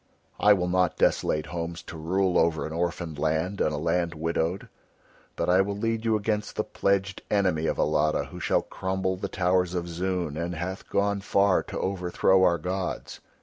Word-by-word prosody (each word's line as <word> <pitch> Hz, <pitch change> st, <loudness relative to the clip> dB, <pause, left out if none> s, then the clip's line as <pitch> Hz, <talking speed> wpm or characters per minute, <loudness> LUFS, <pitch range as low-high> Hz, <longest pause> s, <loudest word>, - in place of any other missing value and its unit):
I 105 Hz, 0 st, +7 dB
will 90 Hz, -3 st, 0 dB
not 90 Hz, -1 st, +1 dB
desolate 75 Hz, 0 st, +2 dB
homes 85 Hz, +1 st, -5 dB
to -, -, -9 dB
rule 90 Hz, +4 st, 0 dB
over 80 Hz, -1 st, +1 dB
an 80 Hz, -, -5 dB
orphaned 85 Hz, -2 st, -3 dB
land 80 Hz, +6 st, 0 dB
and -, -, +2 dB
a 75 Hz, -, -2 dB
land 85 Hz, +2 st, 0 dB
widowed. 80 Hz, +3 st, -1 dB, 0.7 s
But -, -, -1 dB
I 90 Hz, +2 st, +5 dB
will 100 Hz, +1 st, -2 dB
lead 115 Hz, +1 st, -1 dB
you 110 Hz, -1 st, +3 dB
against 105 Hz, 0 st, -1 dB
the -, -, 0 dB
pledged 100 Hz, 0 st, 0 dB
enemy 90 Hz, -6 st, +1 dB
of -, -, -1 dB
Alatta 75 Hz, 0 st, +2 dB
who -, -, -8 dB
shall -, -, +1 dB
crumble 95 Hz, 0 st, -2 dB
the 100 Hz, +1 st, -5 dB
towers 90 Hz, -1 st, +1 dB
of 85 Hz, -1 st, -2 dB
Zoon 85 Hz, -3 st, -2 dB
and 85 Hz, +1 st, -3 dB
hath 90 Hz, +4 st, -5 dB
gone 100 Hz, 0 st, +1 dB
far 100 Hz, -1 st, +3 dB
to -, -, -6 dB
overthrow 95 Hz, 0 st, +2 dB
our 85 Hz, -2 st, +4 dB
gods. 90 Hz, +3 st, -4 dB
90 Hz, 185 wpm, -27 LUFS, 85-95 Hz, 0.7 s, I